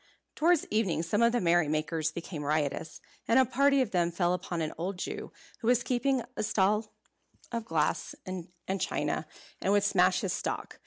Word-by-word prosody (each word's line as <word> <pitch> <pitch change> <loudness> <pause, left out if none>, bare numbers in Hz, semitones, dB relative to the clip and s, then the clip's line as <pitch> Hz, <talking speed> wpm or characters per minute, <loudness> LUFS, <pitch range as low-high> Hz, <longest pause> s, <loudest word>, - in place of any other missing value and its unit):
Towards 335 0 +3
evening 195 -7 +1
some 205 +6 0
of 235 0 +5
the 240 - +1
merrymakers 160 -2 +1
became 165 -1 -6
riotous; 150 +1 -1 0.3
and 230 - +4
a 260 - +6
party 275 +3 +3
of 225 - -7
them 175 -2 +2
fell 175 +1 +1
upon 180 -1 -3
an 155 -1 -2
old 180 +3 -3
Jew - - -5 0.3
who 225 - -4
was 240 -1 +4
keeping 255 0 +1
a - - -2
stall 210 0 +1 0.6
of 230 -1 -3
glass 160 -5 0
and 185 -2 -5 0.3
china, - - -1 0.3
and 195 - +1
would 205 0 +4
smash 185 -1 +3
his 190 -4 -1
stock. - - -4
190 Hz, 175 wpm, -30 LUFS, 170-235 Hz, 0.6 s, a